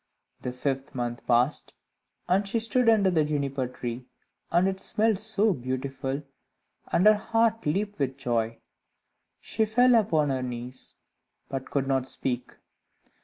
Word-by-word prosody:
The 125 - -3
fifth 135 +2 -3
month 120 -1 -4
passed, 125 +4 +2 0.5
and 195 +3 +2
she 230 +3 0
stood 230 +1 +3
under 205 -4 +4
the 160 -3 +3
Juniper 140 -3 -1
tree, 125 0 -6 0.4
and 175 +3 +4
it 190 0 -2
smelt 215 +1 +1
so 215 -1 +2
beautiful, 135 +1 -3 0.7
and 180 - +3
her 215 - +9
heart 225 -1 +1
leaped 200 +6 -1
with 135 -1 -1
joy. 115 -4 -1 0.8
She 220 - -1
fell 245 +4 +4
upon 160 -11 +3
her 130 -1 -1
knees, 125 0 -6 0.5
but 135 -1 -4
could 135 -2 -1
not 135 -1 +1
speak. 125 -2 -4
140 Hz, 140 wpm, -27 LUFS, 130-205 Hz, 0.8 s, her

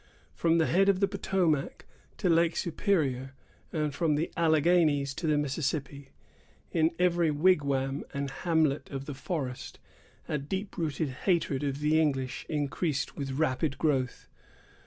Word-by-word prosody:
From 165 0 +2
the 160 - +3
head 195 +5 +3
of 195 -2 +3
the 200 - +3
Potomac 170 -10 -1 0.3
to - - -1
Lake 165 0 +3
Superior, 145 - 0 0.4
and 150 -2 -1
from 160 -2 +1
the 155 +3 -1
Alleghanies 160 -3 +3
to 160 - -4
the 150 -1 +3
Mississippi, 140 -1 -2 0.6
in 160 -1 +3
every 175 -2 +2
wigwam 145 -4 +1
and 140 -1 -3
hamlet 155 0 0
of 135 -1 -5
the 145 - -5
forest, 135 -3 -5 0.5
a 150 - -1
deep 190 +8 -4
rooted 155 -3 -1
hatred 145 0 0
of 140 0 -2
the 155 +1 +3
English 135 -4 -1
increased 150 0 -1
with 135 -2 -4
rapid 140 0 0
growth. 135 -5 -1
150 Hz, 140 wpm, -29 LUFS, 140-170 Hz, 0.6 s, the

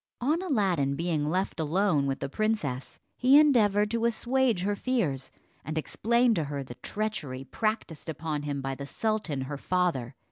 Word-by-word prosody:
On 300 +8 +1
Aladdin 190 - +1
being 155 -2 0
left 185 +2 -1
alone 160 -2 +2
with 135 0 -2
the 140 - -1
princess, 145 - -2 0.2
he 260 +3 +6
endeavoured 210 -8 +4
to 230 0 0
assuage 235 -3 +1
her 205 +1 0
fears, 195 - -1 0.3
and 155 +2 -4
explained 235 +8 +2
to 160 - 0
her 140 -1 -4
the 125 - -9
treachery 150 - -4
practiced 200 - -3
upon 155 -1 -3
him 145 -2 -3
by 135 0 -2
the 140 +1 -7
sultan 210 -8 -1
her 140 +2 -4
father. 165 -10 0
175 Hz, 165 wpm, -28 LUFS, 140-220 Hz, 0.3 s, he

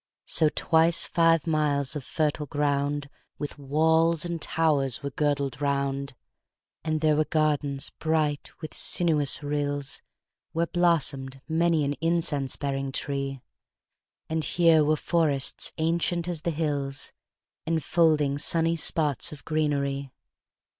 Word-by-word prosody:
5 - - -8
So 155 -2 +4
twice 165 +1 +3
five 165 -2 +2
miles 150 -3 +1
of 145 - -4
fertile 150 +1 -1
ground 145 0 -1 0.3
With 145 0 -6
walls 160 +3 +2
and 170 -2 -4
towers 145 -4 0
were 140 - -3
girdled 140 -2 -1
round: 140 -1 -1 0.7
And 155 -1 -1
there 155 -1 +3
were 155 +1 +2
gardens 145 -3 0
bright 155 -2 0
with 155 - -7
sinuous 150 -5 +1
rills 145 -1 -2 0.5
Where 165 0 +1
blossom'd 145 -7 0
many 165 -1 +2
an 140 - -1
incense 165 -5 +2
bearing 135 -1 -3
tree; 140 -1 -2 0.9
And 160 0 -2
here 165 -1 +4
were 155 +1 +2
forests 150 -4 0
ancient 170 +1 0
as 170 -3 -3
the 170 - -1
hills, 145 -3 -2 0.5
10 165 - +1
Enfolding 155 -3 +2
sunny 165 +2 +3
spots 150 -4 +1
of 150 - -11
greenery. 140 -3 -1
150 Hz, 125 wpm, -26 LUFS, 140-160 Hz, 0.9 s, So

